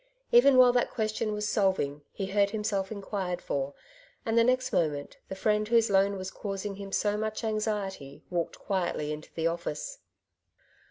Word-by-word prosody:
Even 255 +3 +7
while 250 -1 +8
that 245 - +2
question 215 -1 -1
was 210 0 -2
solving, 190 -9 +1
he 195 - -4
heard 200 +1 +2
himself 210 -2 -2
inquired 195 -3 -3
for; 140 -3 -3 0.5
and 225 -1 0
the 230 - +6
next 255 +1 +1
moment 145 -3 0
the 190 - -4
friend 210 +1 +1
whose 230 -1 +3
loan 195 0 +3
was 185 0 -5
causing 195 -1 -4
him 200 -1 -7
so 205 +1 +1
much 215 +1 -3
anxiety 210 -9 -3
walked 170 -2 -2
quietly 175 -6 -1
into 150 +1 -7
the 165 - -1
office. - - -3
200 Hz, 165 wpm, -29 LUFS, 185-220 Hz, 0.5 s, while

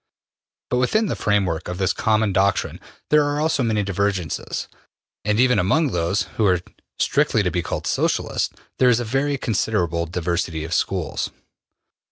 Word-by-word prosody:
But 125 - +2
within 170 - +2
the - - -1
framework 95 -6 0
of 90 - -4
this 95 -1 +1
common 110 -2 +1
doctrine 100 +1 +1 0.3
there 150 0 +6
are 145 +2 0
many 110 -4 +1
divergences, 100 -4 -2 0.6
and 105 +1 +1
even 125 0 +4
among 135 - +2
those 85 +3 0 0.2
who 105 - +4
are 90 -2 +3 0.4
strictly - - +2
to - - 0
be - - 0
called - - -4
Socialists, - - 0 0.3
there 130 - +6
is 120 -1 +4
a 120 - -2
very 135 +5 0
considerable 90 -8 0
diversity 85 -1 -2
of 80 +1 -4
schools. 90 -2 -1
100 Hz, 155 wpm, -22 LUFS, 90-125 Hz, 0.6 s, there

